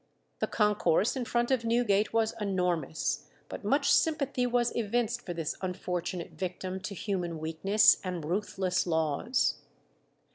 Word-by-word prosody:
The - - 0
concourse 210 - +2
in 255 -2 -2
front 240 +2 0
of 255 -3 +2
Newgate 230 -3 +2
was 225 -1 +1
enormous, 180 -6 -1 0.2
but - - -7
much - - +2
sympathy 280 -6 +1
was 240 -1 +1
evinced 235 +1 0
for 175 - -3
this 165 -2 -2
unfortunate 180 -1 -3
victim 185 0 -4
to 200 +1 -6
human 175 -4 -3
weakness 165 +7 +4
and 180 -4 -4
ruthless 185 +1 -1
laws. 160 - +1
195 Hz, 135 wpm, -30 LUFS, 175-235 Hz, 0.2 s, weakness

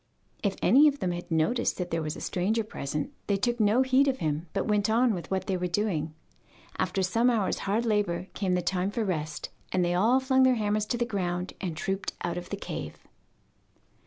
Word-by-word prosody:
If 200 -2 0
any 270 +10 +7
of 290 -1 +2
them 185 -8 -1
had 175 +1 -6
noticed 165 +9 +1
that 180 -1 -4
there 165 0 0
was 155 -1 -3
a - - -9
stranger 210 +5 0
present 150 -7 -4
they 200 - +2
took 240 +4 0
no 215 +4 +4
heed 260 +2 +4
of 265 -1 +1
him, 155 - -2
but - - -2
went 210 -1 +2
on 235 +1 +3
with 175 -3 -6
what 190 0 -1
they 190 - -1
were 180 0 -1
doing. 170 -5 -1 0.6
After 195 - 0
some 230 +7 +3
hours' 220 -6 +1
hard 225 +4 +1
labour 205 -5 0
came 185 -3 0
the 180 - 0
time 185 +2 0
for 220 +2 -2
rest, 155 -5 -3 0.2
and 180 -1 +2
they 175 - +1
all 225 +9 +4
flung 260 0 +2
their 260 -1 +5
hammers 210 -1 0
to 240 - -1
the 240 - +1
ground 180 -4 -2
and 175 -5 -3
trooped 195 0 -2
out 175 - -1
of 175 - -11
the 200 - -3
cave. - - -6
195 Hz, 220 wpm, -28 LUFS, 175-230 Hz, 0.6 s, any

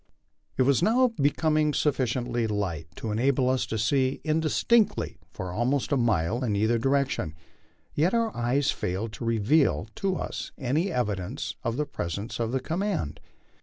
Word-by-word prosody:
It 130 - +4
was 140 +2 +3
now 245 +6 +4
becoming 150 - +1
sufficiently 125 -4 0
light 95 -7 -2
to 110 - -4
enable 125 +4 +2
us 130 - 0
to 110 - -2
see 130 +4 +1
indistinctly 160 +8 +2
for 95 -1 -5
almost 125 +9 0
a - - +4
mile 115 -2 +1
in 110 -5 0
either 110 +3 +2
direction, 135 - 0 0.6
yet 165 +5 +2
our 230 -2 0
eyes 125 +4 +1
failed 100 +5 -3
to 115 - -6
reveal 115 +7 +2
to 195 -4 0
us - - -5
any 145 +7 0
evi 125 - 0
dence 95 +10 -5
of 115 +1 -1
the 150 - 0
presence 100 - -4
of 115 -1 -1
the 130 - 0
command. 165 - -2
130 Hz, 160 wpm, -27 LUFS, 110-150 Hz, 0.6 s, It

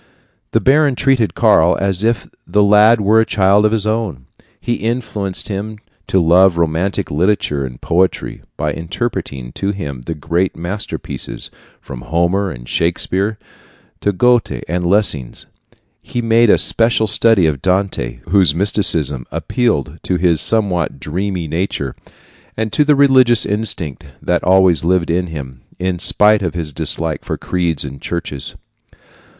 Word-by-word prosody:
The - - +2
baron 140 0 +3
treated 130 -5 +1
Karl - - +4
as 95 -1 0
if 115 -1 0 0.2
the 105 +4 +2
lad 105 +3 +5
were 110 +3 +4
a - - +3
child 100 +1 +3
of - - -3
his 110 -2 0
own. 110 - -2 0.3
He 120 - -2
influenced 110 -4 -3
him 105 +2 -5 0.3
to 95 - +2
love 90 +2 +4
romantic 85 +4 -1
literature 75 -4 0
and 60 -1 -11
poetry 90 +1 -1 0.2
by 75 +1 -1
interpreting 80 - -5
to 100 - -3
him 75 -11 -5
the 80 - -3
great 85 +5 -1
masterpieces, 95 +6 -5 0.3
from - - -9
Homer 85 +8 0
and - - -10
Shakespeare 95 +5 -1 0.6
to 100 - 0
Goethe 120 +4 +1
and 90 +2 -2
Lessing. 85 - +1 0.7
He 120 - -5
made 115 0 +3
a - - +6
special 115 -1 +2
study 110 -3 +3
of 75 -4 -1
Dante, 90 -11 -1
whose 90 -4 +3
mysticism 80 - +1
appealed 85 - -2
to 90 - -2
his 85 -3 +2
somewhat 95 -10 0
dreamy 90 +4 -3
nature, 80 -5 -3 0.6
and 110 -1 -3
to 150 - +3
the 150 0 +3
religious 130 -4 +5
instinct 90 -8 -3
that 90 -1 -1
always 95 -4 +4
lived 85 -1 +1
in 90 +1 0
him, 65 -6 -8 0.2
in 90 -1 -2
spite 105 +3 +4
of 90 -3 -3
his 80 -4 -3
dislike 80 +2 -1
for - - -4
creeds 85 -5 -2
and 70 0 -9
churches. 80 -6 -5
95 Hz, 145 wpm, -16 LUFS, 80-105 Hz, 0.7 s, a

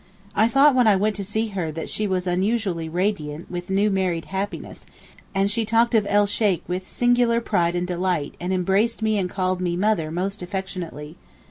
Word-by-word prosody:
I 220 +2 +4
thought 275 +4 +5
when 250 -2 +4
I 210 - +6
went 210 +2 +1
to 200 - -3
see 220 +3 -2
her 180 -6 -3
that 160 - -5
she 210 - -2
was 185 -1 -1
unusually 185 -2 0
radiant 170 -3 -2
with 175 0 -5
new 200 +2 +2
married 185 -4 0
happiness, 195 +2 -5 0.5
and 195 0 +3
she 230 +2 0
talked 230 +2 +2
of 215 -3 +3
'el 205 0 +4
Sheykh' 200 -4 0
with 185 +1 -4
singular 245 -1 +2
pride 175 -6 0
and 175 0 0
delight, 180 -4 -1
and 180 +2 -3
embraced 195 +5 +1
me 215 -1 +2
and 180 -2 -1
called 185 -1 -1
me 175 -1 -1
'mother' 190 -5 +1
most 190 +5 -3
affectionately. 180 -4 -6
190 Hz, 195 wpm, -23 LUFS, 180-215 Hz, 0.5 s, I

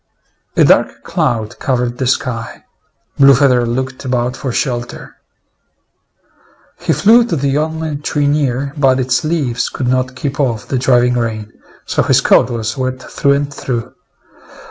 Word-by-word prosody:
A - - +6
dark - - +2
cloud 110 -3 -2
covered 125 -2 -1
the 130 - 0
sky. 120 -2 -2 0.6
Blue 140 0 +7
feather 125 -3 +3
looked 130 +2 -3
about 125 -1 -1
for 130 -1 -4
shelter. 120 -1 -4 1.6
He - - -1
flew 230 +4 +5
to 195 - -1
the 140 0 0
only 160 -1 -3
tree 145 0 -1
near, 140 -2 0
but 135 -2 +3
its 130 +2 0
leaves 150 -7 -1
could 130 - -4
not 130 0 0
keep 140 +1 -4
off 120 -7 -1
the 130 - -1
driving 125 -1 +3
rain, 110 -3 -3 0.3
so - - 0
his - - +3
coat - - +4
was 115 -1 -3
wet 130 -1 -3
through 140 +1 0
and 145 0 -2
through. 120 -4 -4
130 Hz, 150 wpm, -15 LUFS, 120-140 Hz, 1.6 s, Blue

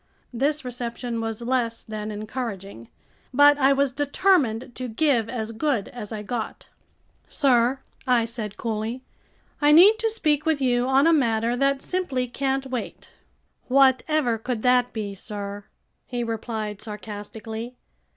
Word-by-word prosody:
This 285 +4 0
reception 240 -1 -4
was 225 0 -4
less 235 -2 -1
than 215 -1 -5
encouraging. 210 - -6 0.4
But 290 +2 +6
I 270 0 +5
was 275 -1 +2
determined 280 - +1
to 255 +1 -5
give 235 -2 +1
as 225 -3 -3
good 235 -2 -1
as 235 -4 -8
I 215 -1 -5
got. 230 +1 -5 0.6
"Sir," 260 -2 +2 0.3
I 245 -2 +3
said 220 -3 -5
coolly, 225 +2 -3 0.6
"I 295 0 +5
need 390 +8 +7
to 450 - +1
speak 305 -9 +1
with 320 -2 +1
you 245 -2 +1
on 265 +2 +4
a 330 - +5
matter 235 -5 +2
that 275 +1 +1
simply 280 -9 -1
can't 270 +2 -1
wait." 255 -3 -6 0.6
"Whatever 265 -1 +3
could 230 -1 -3
that 250 -1 +3
be, 210 -3 -4
sir?" 200 0 -6 0.4
he 245 -1 -3
replied 220 -2 -4
sarcastically. 220 +2 -7
245 Hz, 140 wpm, -24 LUFS, 220-275 Hz, 0.6 s, need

